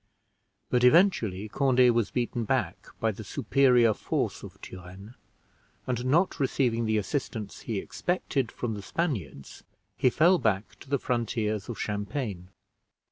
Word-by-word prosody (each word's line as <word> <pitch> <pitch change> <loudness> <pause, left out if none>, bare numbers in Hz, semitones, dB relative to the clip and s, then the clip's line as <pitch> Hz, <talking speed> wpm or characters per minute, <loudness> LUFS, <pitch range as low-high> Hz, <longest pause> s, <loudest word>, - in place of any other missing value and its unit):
But 125 0 +2
eventually 125 - +4
Conde 130 +1 +4
was 115 -4 +1
beaten 120 -1 -2
back 110 - -1
by 110 - +1
the 110 +2 -9
superior 125 -1 +3
force - - -2
of - - -11
Turenne; 95 +4 -11 0.7
and, 125 -1 -2
not 165 +8 +2
receiving 125 -4 +1
the 110 0 +2
assistance 105 -2 -3
he 110 - -4
expected 135 - -2
from 120 -2 -3
the 105 - -6
Spaniards, 100 - -4 0.3
he 130 -1 +3
fell 170 +7 +4
back 110 +1 -1
to - - -14
the 140 - +2
frontiers 115 -4 -2
of 120 - -5
Champagne. 105 -2 -3
115 Hz, 135 wpm, -28 LUFS, 105-130 Hz, 0.7 s, eventually